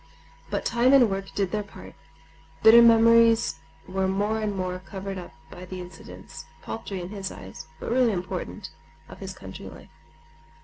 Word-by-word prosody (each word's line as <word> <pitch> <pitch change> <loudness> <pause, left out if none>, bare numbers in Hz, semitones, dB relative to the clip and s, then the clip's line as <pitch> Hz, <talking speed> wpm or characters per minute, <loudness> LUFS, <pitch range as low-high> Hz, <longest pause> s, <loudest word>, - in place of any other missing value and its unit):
But - - -3
time 240 +3 +3
and 245 -6 +6
work 195 0 -4
did 195 -3 0
their 215 - -1
part. 200 - -12 0.7
Bitter 230 +2 +9
memories 230 -4 +5 0.3
were 190 0 -1
more 205 +3 0
and 210 -2 -2
more 185 -1 -3
covered 195 0 -7
up 175 - -10 0.2
by 180 - -10
the 185 0 -7
incidents—paltry 190 +3 -9
in 175 0 -6
his 195 -2 -5
eyes, 95 +10 -10
but - - -5
really 245 -1 +3
important—of 175 -4 -7
his 190 -1 -6
country 95 0 -10
life. - - -14
195 Hz, 150 wpm, -25 LUFS, 185-225 Hz, 0.7 s, Bitter